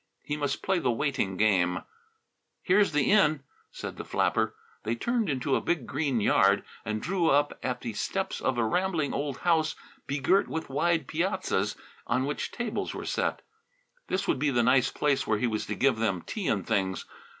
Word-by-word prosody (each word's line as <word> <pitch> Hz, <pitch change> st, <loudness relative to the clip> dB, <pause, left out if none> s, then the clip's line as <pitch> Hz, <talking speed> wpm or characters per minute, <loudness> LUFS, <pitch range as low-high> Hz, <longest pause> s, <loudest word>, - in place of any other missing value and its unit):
He 150 Hz, -, -2 dB
must 145 Hz, -2 st, -2 dB
play 190 Hz, -2 st, +1 dB
the 130 Hz, -, 0 dB
waiting 120 Hz, -6 st, 0 dB
game. 95 Hz, -4 st, +2 dB, 0.8 s
"Here's 200 Hz, +2 st, +4 dB
the 150 Hz, +2 st, +2 dB
inn," 155 Hz, -9 st, +4 dB, 0.3 s
said -, -, -7 dB
the -, -, -5 dB
flapper. -, -, 0 dB, 0.3 s
They 115 Hz, +2 st, -1 dB
turned 235 Hz, -, 0 dB
into 135 Hz, 0 st, 0 dB
a -, -, +1 dB
big 160 Hz, -8 st, -1 dB
green 140 Hz, -3 st, 0 dB
yard 105 Hz, -, +4 dB, 0.2 s
and 110 Hz, 0 st, -3 dB
drew 175 Hz, -2 st, +1 dB
up 145 Hz, +1 st, +2 dB
at 125 Hz, -1 st, -2 dB
the 115 Hz, -3 st, -4 dB
steps 190 Hz, -, -2 dB
of 130 Hz, -2 st, 0 dB
a 115 Hz, -, +2 dB
rambling 170 Hz, +3 st, 0 dB
old 140 Hz, -2 st, -2 dB
house 160 Hz, -3 st, +2 dB, 0.3 s
begirt 145 Hz, +9 st, +2 dB
with 160 Hz, -3 st, -4 dB
wide 165 Hz, +4 st, +1 dB
piazzas 155 Hz, -, -1 dB, 0.3 s
on 130 Hz, +1 st, +1 dB
which 145 Hz, -, -3 dB
tables 240 Hz, -2 st, -3 dB
were -, -, -5 dB
set. -, -, -1 dB, 0.6 s
This 195 Hz, +1 st, -1 dB
would -, -, +1 dB
be 145 Hz, +1 st, +2 dB
the 120 Hz, -3 st, +2 dB
nice 130 Hz, +2 st, +4 dB
place 145 Hz, -2 st, 0 dB
where 110 Hz, -, +2 dB
he 125 Hz, -, 0 dB
was 110 Hz, -3 st, -2 dB
to 105 Hz, -, -2 dB
give 135 Hz, -3 st, +2 dB
them 95 Hz, -6 st, 0 dB
tea 205 Hz, -6 st, -4 dB
and 100 Hz, -4 st, 0 dB
things. 95 Hz, -5 st, 0 dB
140 Hz, 185 wpm, -28 LUFS, 115-170 Hz, 0.8 s, Here's